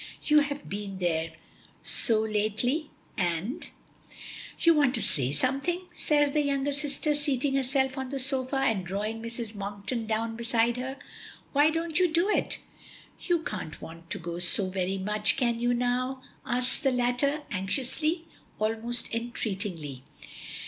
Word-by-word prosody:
"You 300 0 +5
have 290 0 -3
been 200 -1 -5
there 165 -3 -1 0.5
so 220 -3 +3
lately, 220 +8 0 0.3
and 180 - -1 0.5
" - - -12
"You 335 - +7
want 285 -4 +3
to - - -1
say 130 -2 +2
something," 275 - 0
says 290 -3 +2
the 300 - +2
younger 280 0 0
sister, 295 +1 -1
seating 285 -2 0
herself 265 0 +1
on 265 -1 -4
the 275 - -3
sofa, 265 0 +2
and 235 -8 +1
drawing 210 +5 -3
Mrs. 230 -1 -6
Monkton 205 +3 -4
down 225 +1 -1
beside 235 0 +1
her. 260 +2 -4 0.6
"Why 290 +2 +5
don't 325 0 0
you 365 - +5
do 340 +4 +2
it?" - - +1 0.6
"You 345 -3 0
can't 155 - -5
want 165 +1 -11
to - - -2
go 170 0 -5
so 185 +2 +5
very 190 0 -1
much, 210 +4 +3
can 235 -3 +1
you 240 +1 +1
now?" 250 +2 -1 0.2
asks 245 +2 +3
the 275 - +3
latter, 250 +4 +1
anxiously, 275 - 0 0.3
almost 225 +3 0
entreatingly. 195 - -3
245 Hz, 150 wpm, -28 LUFS, 205-280 Hz, 0.6 s, You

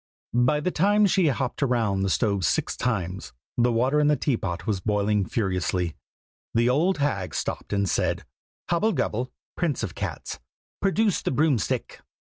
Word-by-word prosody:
"By 125 +5 +3
the 180 - 0
time 205 +5 +4
she 190 -3 +3
had 140 - +2
hopped 130 +1 -3
round 115 -8 +1
the 95 - +1
stove 100 -2 +1
six - - +1
times, 95 -6 -2 0.2
the 120 0 +3
water 130 +6 +2
in 150 - +3
the 150 - +4
teapot 105 - -2
was 105 -4 0
boiling 105 -1 +1
furiously. 90 -5 -1 0.6
The 120 +1 +4
old 165 +9 +2
hag 100 - -1
stopped - - -3
and 100 -1 +1
said - - 0 0.4
"Hobble 205 +6 +2
gobble, 125 +4 -1 0.2
prince 165 -7 -1
of - - -3
cats, - - -5 0.4
produce 200 0 +2
the - - -1
broom 145 -2 +2
stick!" 80 - -3
120 Hz, 165 wpm, -25 LUFS, 100-150 Hz, 0.6 s, time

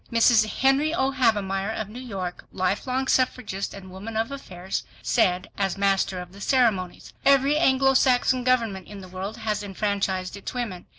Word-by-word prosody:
Mrs. 230 -1 +5
Henry 270 +7 +2
O. 265 -2 +1
Havemeyer 205 -6 +1
of 215 - -3
New 220 +4 -9
York, 190 -8 -5
life 185 +5 -1
long 260 +1 0
suffragist 250 -7 0
and 190 -2 -11
woman 210 +4 -6
of 225 +4 -1
affairs, 190 -9 -5 0.2
said 180 0 +2
as 195 -1 0
master 195 -1 +1
of 180 0 -8
the 200 +2 -13
ceremonies, 215 -8 +1
"Every 275 +1 +4
Anglo 270 -3 +4
Saxon 255 -1 +3
government 230 -7 +1
in 205 -1 -9
the 185 - -10
world 190 +4 -6
has 215 -2 -2
enfranchised 195 -2 -2
its 200 +5 -7
women. 220 -8 -4
210 Hz, 170 wpm, -25 LUFS, 190-255 Hz, 0.2 s, Mrs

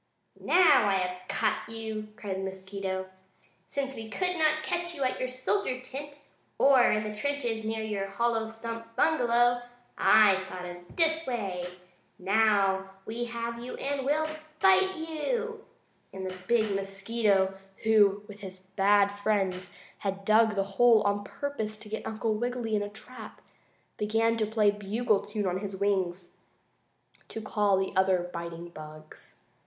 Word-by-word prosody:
"Now 305 - +5
I - - +2
have 180 -1 -3
caught 220 0 -1
you!" 220 -1 -5
cried 200 -3 -4
the 190 - -4
mosquito. 190 0 -4 0.6
"Since 270 +2 -2
we 225 -1 -7
could 360 +7 -1
not 310 -1 +2
catch 345 +1 -2
you 280 - -2
at 255 - 0
your 255 - -1
soldier 255 +3 -1
tent 285 +3 -8 0.4
or 270 -3 +5
in 215 0 +1
the 215 0 -5
trenches 240 -3 -2
near 220 0 -2
your 205 -2 -2
hollow 225 +2 0
stump 230 0 -7
bungalow, 245 -5 +3 0.4
I 205 -3 +6
thought 180 -1 -7
of 175 0 -10
this 320 -2 +2
way. 195 -8 -3 0.5
Now 195 -1 +2 0.2
we 235 +2 -3
have 235 0 -4
you 250 - -6
and 275 -1 -2
we'll 300 +3 +1 0.3
bite 380 0 +5
you!" 440 +8 -3 0.5
and 190 0 -6
the 185 - -5
big 220 -3 +2
mosquito, 195 0 +1 0.3
who 205 -2 +4
with 205 -1 -11
his 190 -2 -9
bad 195 +2 +3
friends 200 -3 -1 0.3
had 195 -1 -4
dug 215 0 +4
the 195 - +2
hole 220 +3 +4
on 205 0 0
purpose 220 -2 -4
to 215 0 -12
get 220 - -4
Uncle 220 0 -1
Wiggily 240 0 -2
in 205 - +1
a 205 - -3
trap, 220 +2 -11 0.6
began 225 +2 +1
to 215 -2 0
play 215 -1 +3
a - - -9
bugle 210 +1 +1
tune 205 0 -4
on 185 0 0
his 200 -1 -5
wings 185 -3 -1 0.9
to - - -6
call 205 -2 +1
the 190 0 -1
other 185 -2 +2
biting 170 0 -6
bugs. 155 -1 -12
215 Hz, 155 wpm, -29 LUFS, 195-245 Hz, 0.9 s, I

